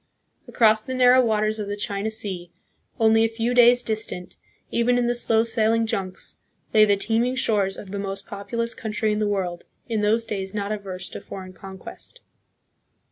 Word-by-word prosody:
Across 215 -2 +4
the 260 - -4
narrow 255 0 +6
waters 215 -1 +1
of 210 - -3
the 205 - -3
China 205 +1 -2
Sea, 195 -5 -4 0.5
only 225 0 +5
a - - +4
few 230 +2 -1
days' 245 0 +6
distant, 215 -5 -4 0.4
even 245 +1 +2
in 245 - +1
the 240 - +2
slow 225 -2 +2
sailing 225 0 +2
junks, 190 -4 -4 0.4
lay 215 -1 +7
the 205 -1 +3
teeming 230 +5 0
shores 205 -6 +1
of 190 - -9
the 200 - -3
most 195 0 -4
populous 230 +4 -3
country 220 -2 -2
in 210 - 0
the 210 - +1
world, 185 -4 -2 0.2
in 225 -3 -1
those 220 +2 +2
days 195 -2 -4
not 205 0 -2
averse 195 -3 -5
to - - -7
foreign 185 -1 -9
conquest. 195 - -10
215 Hz, 180 wpm, -24 LUFS, 200-230 Hz, 0.5 s, lay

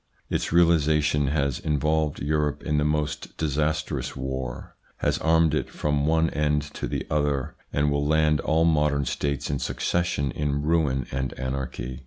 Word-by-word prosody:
Its - - -1
realisation 75 -4 +3
has 70 -3 0
involved 75 0 0
Europe 75 0 0
in 75 0 +1
the - - +1
most 75 0 -2
disastrous 75 -3 -1
war, 65 -2 -5 0.2
has - - 0
armed 80 -1 +3
it 75 - -1
from 75 -1 -1
one 80 0 +3
end 75 0 +1
to 75 - -6
the - - -3
other, 75 -3 0 0.2
and 75 0 +1
will 70 0 +1
land 75 -1 +3
all 80 +3 +2
modern 75 -3 +2
states 70 +2 -2
in 70 - -1
succession 85 -6 -1
in 70 0 -1
ruin 75 -5 +1
and 65 -1 -2
anarchy. 65 -1 -4
75 Hz, 155 wpm, -25 LUFS, 70-75 Hz, 0.2 s, realisation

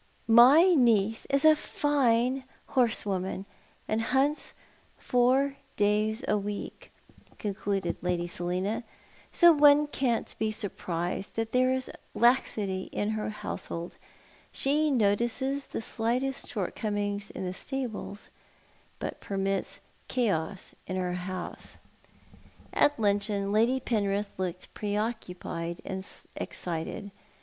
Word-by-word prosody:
"My 265 +11 +8
niece 225 -5 +3
is 275 +2 +2
a 310 0 +8
fine 265 -4 +1 0.3
horsewoman, 200 -6 0 0.4
and 215 +1 0
hunts 270 +6 +1 0.4
four 265 +3 +2 0.2
days 215 +3 +2
a 210 - +2
week," 205 0 -6 0.5
concluded 195 -3 -2
Lady 175 -1 0
Selina, 180 +6 -2 0.2
" - - -27
so 345 -1 +7
one 295 0 +6
can't 260 -5 -1
be 220 - +1
surprised 185 -3 -3
that 225 0 -2
there 255 0 +3
is 260 0 -1 0.2
laxity 215 -6 +2
in 205 +1 -1
her 215 -1 -2
household. 170 -4 -6 0.5
She 300 +3 +2
notices 240 +4 +1
the - - -5
slightest 250 +5 -1
shortcoming 205 0 -2
in - - -4
the 180 - -3
stables, 240 -4 -5 0.7
but - - -5
permits 195 0 -2 0.3
chaos 195 -6 -1
in 185 - -3
her 180 -1 -1
house." 185 +1 -5 1.0
At 290 -3 +3
luncheon 200 -1 +1
Lady 230 +5 +3
Penrith 205 -4 -1
looked 185 -1 -4
pre 205 -1 -3
occuioied 180 -6 -3
and 190 0 -4 0.3
excited. 180 +4 -4
215 Hz, 110 wpm, -29 LUFS, 195-255 Hz, 1.0 s, My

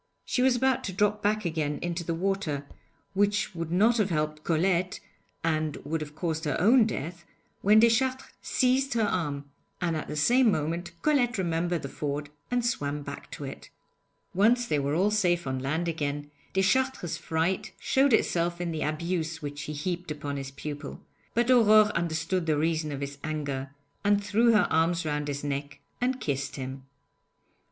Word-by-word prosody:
She 250 - 0
was 260 -1 +4
about 260 +1 +2
to 190 - -4
drop 210 +2 +1
back 215 0 +1
again 155 -3 -1
into 175 0 -2
the 165 0 -2
water, 170 -6 -1 0.5
which 205 +1 +1
would 165 -1 -4
not 220 +7 +4
have 210 -3 +2
helped 155 -2 -1
Colette 180 +2 +1 0.4
and 155 -2 0
would 160 +1 -2
have 150 -1 -7
caused 160 -1 -2
her 145 - 0
own 225 +5 +6
death, 170 -2 -5 0.4
when 210 +2 +6
Deschartres 255 +3 +3
seized 260 +1 +1
her 225 - +3
arm; 145 -8 -1 0.3
and 170 -2 0
at 155 - -4
the - - -5
same 240 - +4
moment 170 +2 -2
Colette 250 -6 +2
remembered 170 -2 0
the - - -3
ford 145 +1 -4 0.2
and 245 -1 0
swam 145 -10 -1
back - - -8
to - - -7
it. - - -8 0.6
Once 235 +6 +4
they 150 -10 +1
were 140 +1 0
all 195 +5 +3
safe 175 -6 +2
on 130 -1 -2
land 155 +6 -1
again, 145 -2 -3 0.2
Deschartres' 190 - +1
fright 165 +4 -1
showed 270 +1 +3
itself 175 -5 +2
in 175 -1 -2
the 160 -1 -3
abuse 160 +1 -2
which 145 0 -5
he 150 - -5
heaped 175 +4 -3
upon 145 -1 -4
his 135 -1 -4
pupil, 145 +1 -7 0.4
but 240 +2 +3
Aurore 215 -3 +6
understood 165 +1 -1
the 155 -2 +2
reason 155 0 0
of 140 -1 -5
his 140 0 -5
anger, 145 -3 -3 0.3
and 205 0 +3
threw 220 +4 +4
her 210 - +5
arms 165 +1 +2
round 150 -1 -1
his 145 0 -3
neck 140 0 -4 0.2
and 255 +1 +1
kissed 140 - -2
him. 130 0 -6
170 Hz, 175 wpm, -28 LUFS, 150-210 Hz, 0.6 s, own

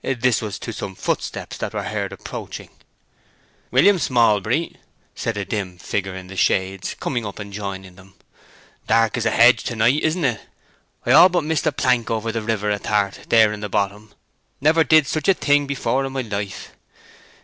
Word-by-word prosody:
This 130 -3 +1
was 105 -2 -5
to 115 - -6
some 95 -2 -6
footsteps - - -3
that - - -5
were - - -2
heard - - -3
approaching. - - -8 1.0
"William 180 +10 +4
Smallbury," 115 - +1 0.4
said 115 -2 -3
a 100 - -3
dim 95 -4 -4
figure 95 +2 -3
in 95 -1 -8
the 95 +1 -10
shades, 95 0 0
coming 120 -3 -2
up 100 -2 -7
and 100 -1 -8
joining 95 -2 -6
them. 95 0 -18 0.7
"Dark 115 -1 +3
as 115 -2 0
a - - +4
hedge, 120 0 +5
to 120 - -3
night, 120 +7 +3
isn't 160 0 0
it? 120 -5 0 0.6
I 120 - +2
all 165 +7 +8
but 175 -2 0
missed 155 0 -1
the - - +3
plank 125 -4 +1
over 115 0 -1
the 115 0 -3
river 105 -1 -1
ath'art 100 -1 -1
there 110 -2 +5
in 105 - -7
the 105 0 -5
bottom—never 105 - -1
did 155 +1 +5
such 155 +3 -3
a 195 - +5
thing 145 -2 +2
before 135 -1 -1
in 135 0 -5
my 135 - -1
life. 100 -4 -5
115 Hz, 180 wpm, -21 LUFS, 100-135 Hz, 1.0 s, all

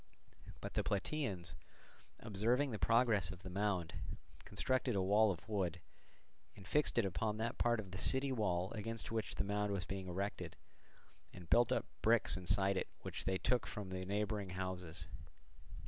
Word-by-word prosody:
But - - -5
the - - +1
Plataeans, 100 - -2 0.7
observing 115 +7 +1
the 110 - -3
progress 115 -6 +4
of 90 0 -8
the 95 - -6
mound, 95 -3 0 0.5
constructed 130 -2 +1
a 95 - +2
wall 105 +3 +5
of 95 +3 -4
wood 95 -6 -1 0.8
and 95 -1 -12
fixed 150 +1 +2
it 115 - +4
upon 105 +3 -1
that 115 +1 -2
part 120 -1 +3
of 95 -4 -6
the 95 - -5
city 135 +4 +4
wall 95 -6 0
against 115 +1 -4
which 115 -1 -2
the - - 0
mound 105 +1 0
was 95 -2 -2
being 95 -1 -4
erected, 95 +3 -3 0.8
and 90 -2 -12
built 120 -1 +5
up - - +1 0.2
bricks 110 +2 +5
inside 95 +2 +2
it - - -1
which - - -5
they 95 - +1
took 120 +4 +1
from 105 -3 -5
the 95 0 -3
neighbouring 105 0 -1
houses. 90 -3 -4
100 Hz, 165 wpm, -38 LUFS, 95-115 Hz, 0.8 s, wall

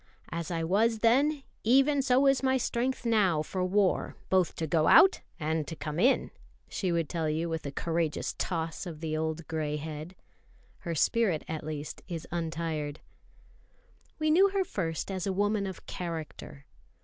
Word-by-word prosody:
"As 170 0 -4
I 165 -2 -2
was 220 +7 +2
then, 275 +5 +3 0.2
even 275 +5 +4
so 260 +1 +3
is 275 -1 +4
my 265 0 +2
strength 250 +1 -1
now 195 -9 +3
for 185 +3 -3
war, 190 +1 +1 0.2
both 185 -2 +3
to 160 - -2
go 160 0 +2
out 385 - +7 0.2
and 155 -1 -1
to 165 - -5
come 155 +1 -4
in," 255 +8 +3 0.4
she 185 -3 -2
would 165 -2 0
tell 165 -1 -1
you 160 +2 -1
with 160 -3 -3
a - - -4
courageous 165 +1 -1
toss 165 0 -2
of 160 -3 -7
the 155 -1 -3
old 160 0 -2
grey 155 -2 -2
head. 155 +3 -7 0.6
Her 170 -2 -4
spirit 190 -1 +2
at 160 -1 -4
least 150 -1 -6
is 170 -3 -5
untired. 160 -3 -3 1.2
We 310 0 +1
knew 380 +5 +6
her 390 -1 0
first 165 - -3
as 190 -1 -3
a 195 - 0
woman 205 +1 +1
of 190 - -8
character. 160 -4 -6
170 Hz, 170 wpm, -29 LUFS, 160-225 Hz, 1.2 s, out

